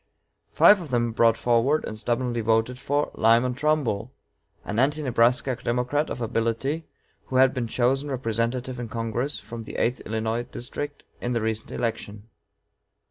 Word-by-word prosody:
Five 205 -2 +6
of 160 - -8
them 120 -2 +1
brought 115 0 +3
forward, 125 +6 +2
and - - -5
stubbornly 120 +1 -1
voted 115 +3 +1
for, 145 +2 0
Lyman 115 +3 +3
Trumbull, 130 -6 0 0.5
an 105 +2 -2
Anti 145 +4 +2
Nebraska 125 +1 +2
Democrat 125 +6 0
of - - -5
ability, 115 +7 -1 0.4
who 130 - -6
had 130 0 +5
been 125 -3 -2
chosen 130 +5 +1
representative 125 0 -2
in 120 -2 -5
Congress 115 +5 -2
from 115 0 -8
the 110 - -9
eighth 125 +2 0
Illinois 110 +1 -2
District 145 +4 -6 0.2
in 125 - -1
the 115 - 0
recent 110 0 -2
election. 110 -2 -4
120 Hz, 150 wpm, -25 LUFS, 115-130 Hz, 0.5 s, Five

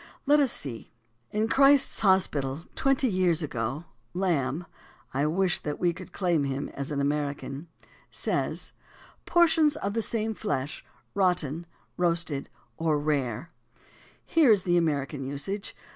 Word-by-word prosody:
Let 295 +1 +5
us 275 -5 +4
see. 120 -5 -4 0.4
In 215 +1 0
"Christ's 275 +2 +5
Hospital 165 -7 +2
Twenty 270 -1 +2
Years 180 -5 +2
Ago," 135 +3 -3 0.3
Lamb 170 -4 0 0.5
(I 140 +3 +1
wish 180 +2 +1
that 150 -1 -4
we 175 -1 +2
could 185 +2 -10
claim 175 -6 +1
him 140 0 -2
as 140 -1 -6
an 145 -2 -2
American) 145 +1 -2 0.4
says: - - -2 0.6
"Por 345 -1 +5
tions 310 -2 +3
of 200 -8 -3
the 230 - 0
same 220 0 -1
flesh, 145 -10 -3 0.3
rotten 175 -4 +1
— - - -39
roasted 170 -5 0 0.3
or 160 -2 +1
rare." 145 -1 -1 0.7
Here 310 -7 +5
is 205 -3 +4
the 175 -1 +2
American 145 -4 0
usage. 145 +10 -3
170 Hz, 140 wpm, -27 LUFS, 140-200 Hz, 0.7 s, Let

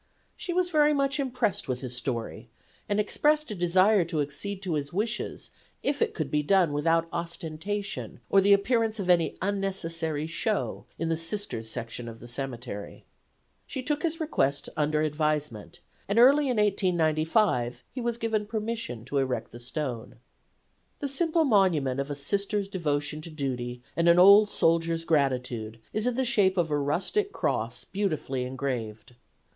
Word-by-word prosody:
She 425 -4 -5
was 355 0 +1
very 300 -1 +4
much 275 0 +1
impressed 250 -6 -1
with 125 -1 -2
his 125 -2 -4
story, 120 -2 -4 0.4
and 205 0 +1
expressed 300 +6 +2
a - - -1
desire 185 +2 +4
to 165 -2 -2
accede 185 +8 -4
to 180 -3 -2
his 145 -1 -2
wishes 215 +5 -2 0.3
if 285 0 -1
it - - +1
could 150 -4 -3
be 150 - +2
done 175 -1 +3
without 165 +3 +2
ostentation 170 +4 -4
or 195 - +5
the 200 +1 +4
appearance 220 +2 +3
of 185 -2 +2
any 170 -2 +2
unnecessary 165 -6 -1
show 185 +6 -2
in 165 - -2
the 165 - +2
Sisters' 165 - -1
section 120 0 -5
of 115 0 -10
the 120 - -11
cemetery. 120 -5 -6 0.6
She 260 - -5
took 295 +2 -1
his 330 -1 -1
request 145 - 0
under 150 0 +1
advisement, 150 -2 -2 0.3
and 200 - -1
early 275 +5 +6
in 250 -3 0
1895 165 - +1
he 255 - -5
was 235 -1 -1
given 220 -3 -1
permission 215 - -3
to 140 +2 -1
erect 130 -2 -2
the 120 - -10
stone. 125 -2 -5 0.8
The 285 - -3
simple 320 +3 +2
monument 170 - +2
of 140 +1 -2
a 145 - -3
Sister's 200 +7 -1
devotion 150 -5 -2
to 165 - -9
duty 125 -5 -4
and 170 +1 +3
an 170 - +6
old 200 +3 +8
soldier's 165 -1 +1
gratitude 125 -7 0
is 215 +3 0
in 250 - 0
the 260 +1 0
shape 195 -5 +3
of 165 -3 +1
a 150 - +2
rustic 190 - 0
cross - - -1
beautifully 155 -10 -2
engraved. 125 -4 -4
170 Hz, 160 wpm, -27 LUFS, 140-210 Hz, 0.8 s, old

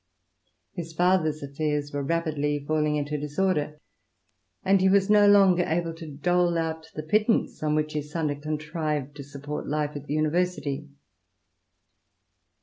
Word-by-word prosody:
His 165 -3 -6
father's 160 -3 +2
affairs 145 +1 -2
were 145 - -1
rapidly 145 -2 -1
falling 150 0 +1
into 150 0 -2
disorder, 150 0 -1 0.9
and 195 0 +4
he 190 - +4
was 195 +1 +3
no 205 -1 +6
longer 195 -3 +6
able 165 -1 -1
to 165 0 -9
viii. 150 - -9
INTRODUCTION. - - -12
dole 175 -1 +2
out 160 -1 -3
the 155 - -4
pittance 215 +8 +1
on 150 0 +1
which 155 0 -1
his 150 0 -4
son 160 -1 -1
had 145 0 -4
contrived 150 -2 -3
to 140 - -7
support 145 +1 -6
life 150 0 -1
at 145 0 -6
the 145 - -2
University. 155 -2 -1
155 Hz, 155 wpm, -26 LUFS, 150-175 Hz, 0.9 s, no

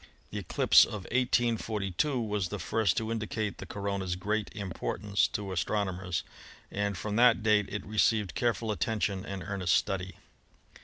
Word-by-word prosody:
The - - -3
eclipse - - +5
of 105 -3 -4
1842 120 0 +1
was 105 -5 -1
the 105 - -4
first 105 -1 +1
to 110 0 -1
indicate 110 -2 -3
the - - -7
corona's 100 -3 -2
great 105 +3 -1
im 100 -3 -4
portance 100 +3 0
to 100 -2 -3
astronomers, 95 -1 -1 0.5
and 100 -1 -1
from 105 +4 -3
that 120 -2 +5
date 105 -2 +3
it 105 -2 -4
received 105 -1 +2
careful 115 -2 0
attention 105 -3 -1
and 95 -2 -5
earnest 95 -4 0
study. 95 -2 -1
105 Hz, 150 wpm, -30 LUFS, 95-110 Hz, 0.5 s, eclipse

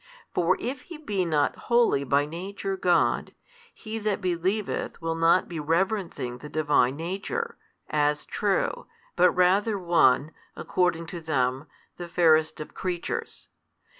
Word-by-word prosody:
For 170 -1 +2
if 255 +2 -4
He 335 - -7
be 205 - -2
not 150 -3 +1
wholly 235 -12 +4
by 140 +2 +2
Nature 195 +5 -5
God, 175 -3 +1 0.4
he 220 - -6
that 210 -2 -1
believeth 185 +3 -2
will 165 -1 -2
not 165 +3 +3
be 170 -3 -5
reverencing 165 - -1
the 150 - -9
Divine 145 -4 +2
Nature, 195 - -4 0.3
as 150 0 0
true, 200 -2 -1 0.3
but 180 - +5
rather 190 +5 +2
one 165 -5 +3 0.2
(according 180 -2 0
to 170 +1 -7
them) 135 -2 -1 0.3
the 175 - -6
fairest 160 -2 +3
of 155 - -8
creatures. 185 - -4
175 Hz, 135 wpm, -26 LUFS, 155-195 Hz, 0.4 s, but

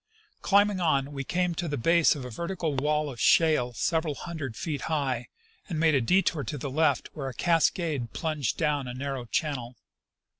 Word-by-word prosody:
Climbing 205 -1 +3
on, 140 -5 +1
we 135 -1 -4
Came 180 +4 0
to 170 +1 -3
the 145 -2 -2
base 165 +7 +4
of 135 -3 -6
a 125 - -7
vertical 170 - -3
wall 150 +2 +1
of 125 -5 -7
shale 155 -7 +4
several 160 +3 0
hundred 155 -9 -6
feet 150 -5 -3
high, 135 -6 -1 0.4
and 165 -4 -2
made 160 -1 +4
a 135 - +3
detour 170 +2 +2
to 135 +5 -4
the 135 0 -5
lelt 155 +3 +1
where 135 -4 -4
a 125 - -10
cascade 165 -6 +1
plunged 155 -5 -2
down 145 -4 0
a 125 - -6
narrow 135 -1 -4
channel. 125 -2 -2
150 Hz, 185 wpm, -27 LUFS, 135-165 Hz, 0.4 s, base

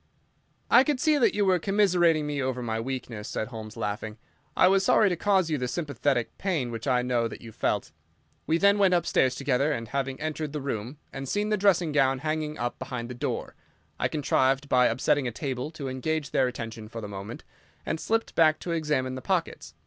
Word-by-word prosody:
"I 245 - +8
could 290 -2 0
see 305 0 +3
that 245 - +3
you 205 -1 +2
were 185 -2 +3
commiserating 175 -5 +3
me 145 -1 -2
over 130 -1 -2
my 110 -1 -2
weakness," 120 -3 -5
said 110 - -3
Holmes, 110 -2 -8
laughing. 105 0 -4 0.4
"I - - +6
was 195 +1 +4
sorry 205 +2 +4
to 180 - 0
cause 190 -2 +2
you 150 - 0
the 125 - -1
sympathetic 135 -3 -1
pain 160 -11 -1
which 115 +3 -6
I 125 -2 +2
know 120 -2 +1
that 115 - -9
you 115 - -10
felt. - - -1 0.6
We 160 - +3
then 200 +3 +4
went 190 -2 +5
upstairs 130 -6 +2
together, 140 +2 +1
and 115 -5 -3
having 135 0 -2
entered 155 -1 -3
the 150 - -2
room 130 -1 -4 0.2
and 135 -1 -5
seen 210 +1 0
the 215 - +3
dressing 190 -5 +3
gown 135 -2 +3
hanging 155 +2 -2
up 120 0 -3
behind 125 -2 -5
the - - -5
door, 120 - -3 0.5
I - - +2
contrived, 135 -2 +1
by 125 -2 +4
upsetting 130 +3 +1
a - - -2
table, 130 +2 -4
to 155 -4 -7
engage 140 +3 -2
their 130 - +3
attention 115 -3 -6
for 115 - -7
the 105 - -6
moment, 100 +3 -7 0.4
and 160 - -2
slipped 225 +5 -1
back 155 -1 +4
to 175 - -4
examine 150 -6 0
the 130 - -6
pockets. - - -2
140 Hz, 210 wpm, -27 LUFS, 125-165 Hz, 0.6 s, I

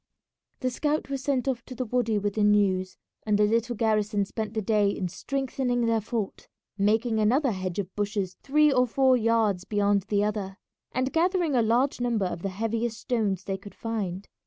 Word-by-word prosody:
The 255 -1 0
scout 295 +2 -1
was 275 -1 -2
sent 270 -2 0
off 255 -3 -1
to 255 - -9
the 255 - -2
wady 230 -2 0
with 205 0 -1
the 215 - 0
news, 195 -3 +2 0.3
and 210 -1 +2
the 210 - +4
little 230 +3 +1
garrison 215 -2 +1
spent 220 +2 -5
the 220 - 0
day 210 0 +3
in 190 -2 -2
strengthening 255 +1 -1
their 225 -1 +2
fort, 215 -2 -4 0.3
making 220 +3 +1
another 250 +6 +3
hedge 185 -3 -4
of 195 -2 -4
bushes 205 -2 -2
three 300 +2 +4
or 250 -1 +3
four 260 +2 +4
yards 225 -5 +2
beyond 205 -1 +1
the 205 -1 +2
other, 200 -2 -3 0.3
and 255 +2 -1
gathering 345 -2 +2
a 245 - +4
large 245 +4 +1
number 235 -5 +1
of 180 -2 -4
the 195 - -2
heaviest 225 +3 -2
stones 210 -8 -1
they 195 -1 -3
could 200 +1 -12
find. 200 -4 -4
220 Hz, 190 wpm, -27 LUFS, 205-250 Hz, 0.3 s, the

